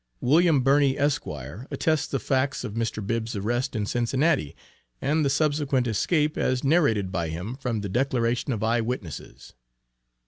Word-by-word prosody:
William 155 +2 +4
Birney, 135 +1 +3
Esq., 145 0 0 0.4
attests 155 -1 0
the 135 - -1
facts 135 +3 0
of 100 - -5
Mr. 110 -2 -2
Bibb's 115 +1 -2
arrest 120 +6 -1
in 105 -2 -1
Cincinnati, 125 - 0 0.4
and 150 +3 +1
the 140 - +2
subsequent 145 -2 +1
escape, 150 - +1
as 130 -1 0
narrated 135 - +2
by 85 -4 -1
him, 90 +10 -5
from 125 -5 -3
the 100 - -4
declaration 125 +2 0
of 110 -3 -2
eye 115 +1 +2
witnesses. 110 - -6
125 Hz, 150 wpm, -25 LUFS, 110-145 Hz, 0.4 s, William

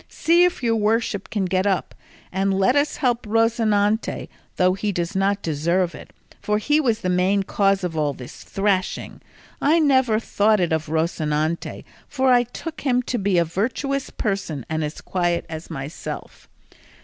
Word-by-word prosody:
See 345 +2 +4
if 355 -7 -1
your 230 -1 +2
worship 215 -1 0
can 205 -3 -1
get 185 +2 +1
up, 190 -2 0 0.4
and 195 +1 0
let 195 +7 +3
us 285 +1 +1
help 245 -4 +1
Rocinante, 220 -1 +1 0.3
though 185 0 +3
he 205 +2 -2
does 175 +1 -3
not 200 +1 +1
deserve 170 +3 0
it, - - -11 0.3
for 210 0 0
he 295 +8 +2
was 230 -5 0
the - - -2
main 185 +2 +2
cause 195 0 +1
of 175 -2 -3
all 150 -2 +1
this 125 -2 -11
thrashing. 195 -2 -1 0.4
I 305 +4 +4
never 260 -8 +3
thought 215 -1 +2
it 175 -3 +1
of 160 -1 -1
Rocinante, 160 0 -1 0.2
for 265 -2 +2
I 245 - +6
took 320 +6 -8
him 250 -3 +1
to 245 - -2
be 195 -2 +1
a 170 - +4
virtuous 260 - -2
person 195 - -3
and 160 0 -2
as 150 0 -5
quiet 175 -2 -1
as 160 0 -7
myself. 150 0 -7
200 Hz, 170 wpm, -22 LUFS, 175-230 Hz, 0.4 s, I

